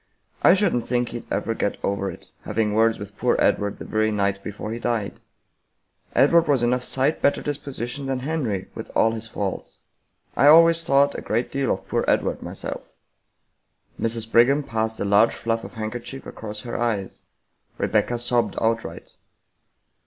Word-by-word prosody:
I 180 - +7
shouldn't 185 - +1
think 120 -1 0
he'd 120 - -8
ever 115 - -1
get 100 - -2
over 100 0 -1
it, - - -11
having 105 -2 -1
words 115 +1 +3
with 100 0 -9
poor - - +2
Edward 100 0 +1
the - - -8
very 110 0 +1
night 100 -2 -1
before 105 +1 -6
he 115 - -4
died. 115 -4 -2 1.0
Edward 170 0 +5
was 135 -5 +2
enough 125 +1 +2
sight 135 +4 0
better 140 - +3
disposition 140 -2 -4
than 135 -1 -1
Henry, 130 -10 -2
with - - -7
all 110 - +4
his 110 0 -5
faults. 100 -3 -5 0.6
I 145 - +4
always 165 +2 +7
thought 140 -1 +3
a - - -5
great 115 +3 -1
deal 135 -2 0
of - - -3
poor - - 0
Edward, - - +1
myself." - - -7 1.1
Mrs. 115 0 -2
Brigham 135 +5 +5
passed 110 -3 -2
a - - -1
large 100 +3 +4
fluff 115 0 -2
of - - -10
handkerchief 120 +4 -6
across 105 -1 -7
her 120 0 -6
eyes; 110 -5 -2 0.5
Rebecca 120 - +1
sobbed 120 0 0
outright. 115 0 -2
115 Hz, 165 wpm, -23 LUFS, 110-135 Hz, 1.1 s, I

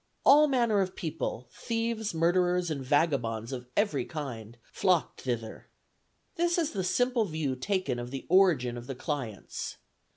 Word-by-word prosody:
All 300 +2 +8
manner 235 -7 +2
of 185 -1 -2
people, 150 - -4
thieves, 230 -2 -2
murderers, 175 +1 +2
and 140 -3 -3
vagabonds 125 -6 +1
of 125 -2 -6
every 205 - +2
kind, 120 -7 -7
flocked 180 +6 0
thither. 115 -3 -4 0.7
This 345 +1 +2
is 320 -3 +1
the 190 -3 -2
simple 245 +4 +2
view 155 -7 -2
taken 145 -3 -1
of 120 0 -5
the 135 +1 -6
origin 160 -10 +4
of 120 - -11
the 135 - -4
clients. 130 -6 -5
160 Hz, 150 wpm, -29 LUFS, 125-205 Hz, 0.7 s, All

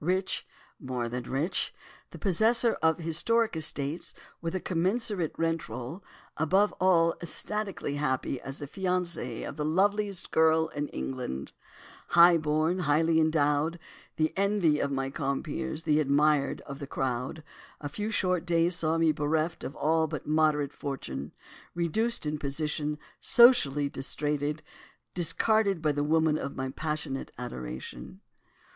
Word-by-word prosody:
Rich—more 135 -8 -3
than 125 +1 -4
rich, 155 +8 -1 0.3
the - - -10
possessor 225 +5 +3
of 160 -1 +3
historic 180 +7 +1
estates, 150 0 -2 0.3
with 165 +2 -3
a - - 0
commensurate 185 0 0
rent 165 -1 -1
roll, 135 +10 -6 0.3
above 190 +7 +3
all 170 -3 +4
ecstatically 195 -3 -3
happy 130 -2 -1
as 135 +1 -7
the 145 - -6
fiancé 180 +1 -2
of - - -7
the 150 - -1
loveliest 200 +4 +1
girl 160 0 +4
in 145 -1 -3
England—high 70 - +1
born, 155 +4 +1
highly 160 0 +3
endowed, 155 +1 +2 0.4
the 155 0 +1
envy 195 -6 +2
of 140 - 0
my 135 0 -2
compeers, 155 +3 -3
the 150 -1 +3
admired 145 0 +2
of 140 -1 -9
the 140 - -6
crowd—a 135 +4 -5
few 205 +9 -4
short 180 -5 +1
days 170 0 +2
saw 160 0 +1
me 165 -1 +4
bereft 155 +2 -1
of 140 - -6
all 160 +2 +2
but - - -5
a - - -7
moderate 155 -2 +2
fortune, 75 - -5 0.4
reduced 175 +6 0
in 150 0 -2
position, 150 +1 -2 0.2
socially 150 - +5
disrated, 145 +2 -2 0.5
discarded 200 +2 +2
by 155 -1 +1
the 145 0 -1
woman 160 0 +2
of 140 - -5
my 130 0 -3
passionate 150 -2 -3
adoration. 65 - -7
155 Hz, 135 wpm, -29 LUFS, 145-175 Hz, 0.5 s, socially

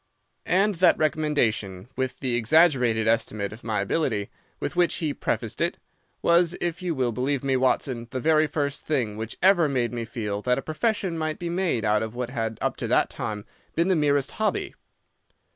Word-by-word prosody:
"And 200 +4 +3
that 185 - +6
recommendation, 120 -11 0
with 130 -1 -3
the 130 -3 -1
exaggerated 120 -3 +3
estimate 110 -3 0
of 110 - -13
my 110 -3 -1
ability 105 -2 -1 0.3
with - - -4
which 175 -1 +3
he 155 -4 -2
prefaced - - -3
it, - - +1 0.5
was, 170 0 +4
if 175 0 -2
you 175 -3 -2
will 125 -3 0
believe 130 +4 -1
me, 135 -1 +1
Watson, 130 -2 0
the 130 - -3
very 155 +2 +3
first 145 -1 -2
thing 125 -9 0
which 110 +1 -5
ever 180 -5 +5
made 125 -3 0
me 120 -1 -3
feel 105 -3 -4
that 125 +2 +1
a 135 - -3
profession 175 +1 -1
might 155 -1 -2
be 175 - -4
made 175 - 0
out 105 0 +2
of 110 +1 -4
what 125 0 -3
had 115 -3 -3
up - - -1
to - - -3
that - - +2
time 105 -1 -5 0.3
been 170 +3 +2
the 190 - +4
merest 145 -3 +2
hobby. 215 -1 -1
130 Hz, 190 wpm, -25 LUFS, 115-160 Hz, 0.5 s, that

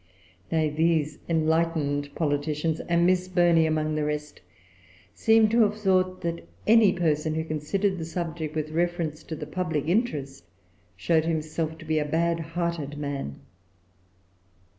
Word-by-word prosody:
Nay, 155 -2 +1
these 155 -1 +1
enlightened 160 -3 0
politicians, 150 +1 -1
and 170 0 +1
Miss 185 0 +2
Burney 175 -3 +4
among 155 0 0
the 155 0 -1
rest, 150 0 -4 0.7
seem 225 - +4
to 230 +2 +3
have 210 0 +2
thought 185 -2 +1
that 170 -1 -4 0.2
any 220 -2 +6
person 155 -3 0
who 160 - -1
considered 185 +5 -1
the 160 - -4
subject 165 -2 -4
with 155 0 -2
reference 170 -2 -1
to 160 - -6
the 150 - -6
public 155 -2 -2
interest 155 - -1 0.5
showed 160 - +2
himself 160 0 -2
to 165 - -12
be 155 0 +1
a 150 - -1
bad 165 +2 +1
hearted 165 -3 -3
man. 140 - -4
160 Hz, 140 wpm, -26 LUFS, 150-175 Hz, 0.7 s, any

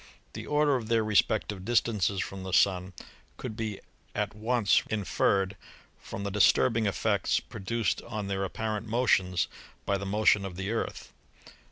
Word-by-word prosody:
The - - -7
order 150 -1 +3
of 115 -3 -6
their 115 -1 +2
respective 105 -2 +1
distances 105 -4 +1
from 95 -1 -5
the 95 -1 -6
Sun 90 +1 +3 0.4
could 110 - -6
be 110 -3 -4 0.4
at - - -1
once 110 -1 +2
inferred 100 -2 +1 0.4
from 100 - -7
the 100 - -3
disturbing 110 +2 +3
effects 100 - +1
produced 115 +3 -2
on 110 -3 -4
their 95 0 -2
apparent 110 +2 -3
motions 95 -7 +2 0.4
by 100 0 0
the 100 - -5
motion 105 0 +3
of 95 -2 -6
the 95 +3 -3
Earth. 115 - -4
105 Hz, 150 wpm, -29 LUFS, 95-115 Hz, 0.4 s, order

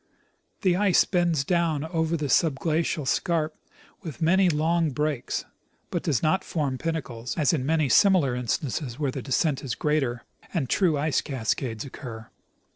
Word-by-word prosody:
The 180 -2 +3
ice 195 -3 +4
bends 175 -6 +1
down 165 -2 0
over 160 0 -1
the 150 - -3
subglacial 155 +1 +1
scarp 160 -1 0 0.5
with 165 -6 -8
many 185 +3 +4
long 165 +1 +1
breaks, 150 -1 -2 0.5
but 175 - -1
does 145 -9 0
not 155 +4 +2
form 140 -6 -2
pinnacles, 125 -8 -4
as 155 +1 +3
in 135 -4 -1
many 155 -2 +2
simi 195 +7 +5
lar 140 -7 +1
instances 125 +1 -2
where 145 -3 -1
the 135 - -5
descent 140 +2 0
is 125 -4 -3
greater, 135 -6 0 0.3
and 150 -6 0
true 175 -6 +3
ice 145 -1 +1
cascades 115 -2 -2
occur. 115 -5 -9
155 Hz, 155 wpm, -26 LUFS, 135-165 Hz, 0.5 s, simi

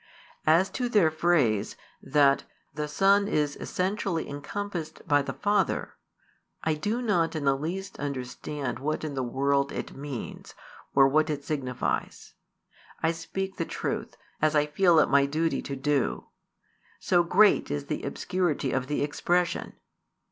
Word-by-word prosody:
As 170 +5 +4
to 245 -1 -2
their 200 -9 +4
phrase, 155 -11 +2 0.3
that 140 -1 +3 0.3
"the 150 +1 -3
Son 200 +6 +3
is 150 -6 0
essentially 185 -3 -2
encompassed 160 +3 -5
by 145 -1 +4
the 140 - -4
Father," 205 0 0 0.7
I 160 - +2
do 210 +11 -2
not 175 -8 +1
in 150 -2 -2
the 135 0 +4
least 185 +7 -5
understand 140 -1 -4
what 155 +3 -2
in 155 -2 -3
the 135 - -2
world 140 +3 +1
it - - -5
means, 140 -3 -7 0.4
or 135 -1 +7
what 155 +3 +2
it 145 -2 -3
signifies, 130 -5 -3 0.7
I 160 - +3
speak 190 +3 -5
the 165 - 0
truth, - - -4 0.2
as 155 0 +3
I 150 0 +4
feel 170 +3 +3
it - - +5
my 140 0 +4
duty 160 +3 0
to 140 - -5
do, 140 -1 -1 0.7
so 175 -2 +3
great 195 +5 +4
is 75 -1 -3
the - - -3
obscurity 170 -8 -1
of 130 -1 -1
the 145 - 0
expression. 175 +4 0
155 Hz, 150 wpm, -27 LUFS, 140-180 Hz, 0.7 s, or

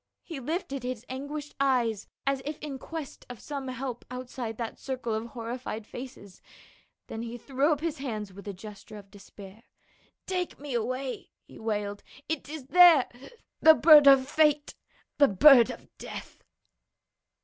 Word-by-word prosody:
He 325 -6 -7
lifted 275 -1 -3
his 250 -1 -5
anguished 285 +3 -6
eyes 245 -6 +1 0.2
as 275 -1 0
if 300 +2 -5
in 280 -3 -7
quest 320 0 -7
of 245 -3 -8
some 280 -2 -6
help 255 -1 -5
outside 250 -3 -6
that 230 -2 -5
circle 255 -4 -4
of 220 +2 -3
horrified 230 -1 -6
faces, 240 -6 -10 0.6
then 225 - -6
he 235 +1 -6
threw 275 +5 0
up 295 -1 0
his 325 -4 -3
hands 215 -7 -5
with 200 +2 -12
a - - -2
gesture 210 +2 -11
of 200 -1 -14
despair. 200 +1 -13 0.6
"Take 365 -2 -3
me 285 -2 -6
away!" 255 +3 -3 0.2
he - - -14
wailed, 205 -2 -3 0.3
"it 315 -3 -3
is 305 -3 -7
there 345 -3 +7 0.3
— - - -37
the 315 -1 +8
bird 300 -3 +8
of 270 -1 +7
fate 300 0 +2 0.2
— - - -36
the 285 - +7
bird 240 +4 +7
of - - -8
death." - - -9
255 Hz, 160 wpm, -28 LUFS, 225-290 Hz, 0.6 s, the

